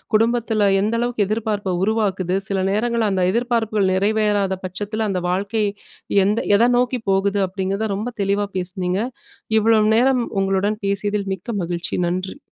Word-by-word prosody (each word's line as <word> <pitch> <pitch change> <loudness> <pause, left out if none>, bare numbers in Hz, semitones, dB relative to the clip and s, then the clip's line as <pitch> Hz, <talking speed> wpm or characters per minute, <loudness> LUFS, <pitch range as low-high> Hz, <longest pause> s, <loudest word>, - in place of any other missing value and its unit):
குடும்பத்துல 225 -2 +2
எந்த 215 +3 0
அளவுக்கு 240 -3 0
எதிர்ப்பார்ப்ப 210 -3 -1
உருவாக்குது, 195 -4 0
சில 195 -1 0
நேரங்கள்ல 225 0 +1
அந்த 185 -1 +1
எதிர்பார்ப்புகள் 225 -4 +1
நிறைவேறாத 205 -1 +1
பட்சத்துல, 205 +4 -3
அந்த 185 -2 -1
வாழ்க்கை 200 +4 0 0.6
எந்த 210 +3 +1 0.2
எத 235 +3 +4
நோக்கி 250 0 +1
போகுது 200 +1 +1
அப்டிங்கிறத 195 +3 -2
ரொம்ப 225 +5 -4
தெளிவா 200 +1 0
பேசுனீங்க. 185 +1 -2 0.6
இவ்வளவு 215 -1 +3
நேரம் 255 0 +3 0.2
உங்களுடன் 195 +2 0
பேசியதில் 200 0 -1
மிக்க 185 +6 -14
மகிழ்ச்சி. 170 -1 -3
நன்றி. 185 +7 -3
205 Hz, 135 wpm, -21 LUFS, 190-220 Hz, 0.6 s, எத